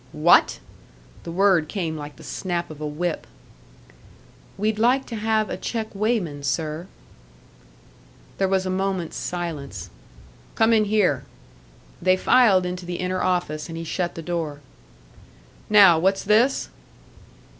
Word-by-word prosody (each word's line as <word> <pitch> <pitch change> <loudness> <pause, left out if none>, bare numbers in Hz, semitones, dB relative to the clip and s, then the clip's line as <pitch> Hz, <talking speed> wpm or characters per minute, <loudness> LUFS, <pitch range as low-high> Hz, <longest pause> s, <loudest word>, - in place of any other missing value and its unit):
"What?" - - +5 0.7
The 170 - -5
word 185 -3 +3
came 165 -4 -3
like 150 -1 -8
the - - -14
snap 175 -3 -3
of 155 -1 -11
a 150 - -2
whip. 160 +3 -3 1.3
"We'd 215 +1 -1
like 255 +4 +3
to 230 - -7
have 220 0 0
a - - -3
check 225 -2 -4
weighman, 200 -8 -1
sir." 155 +5 -3 1.5
There 195 - +2
was 190 0 +1
a 185 - -1
moment's 190 -3 -2
silence. 140 - -5 0.6
"Come 225 +1 +4
in 215 -1 +4
here." 200 -10 +1 0.8
They 185 +1 +3
filed 195 -4 +4
into 180 0 -4
the 175 - -3
inner 185 +1 -2
office, 175 -4 -1
and 165 - -6
he 165 - -5
shut 175 +2 -3
the 165 - -7
door. 160 -4 -4 1.1
"Now. 195 -6 +7
What's 190 +3 +1
this?" 225 +6 +2
180 Hz, 135 wpm, -23 LUFS, 160-210 Hz, 1.5 s, Now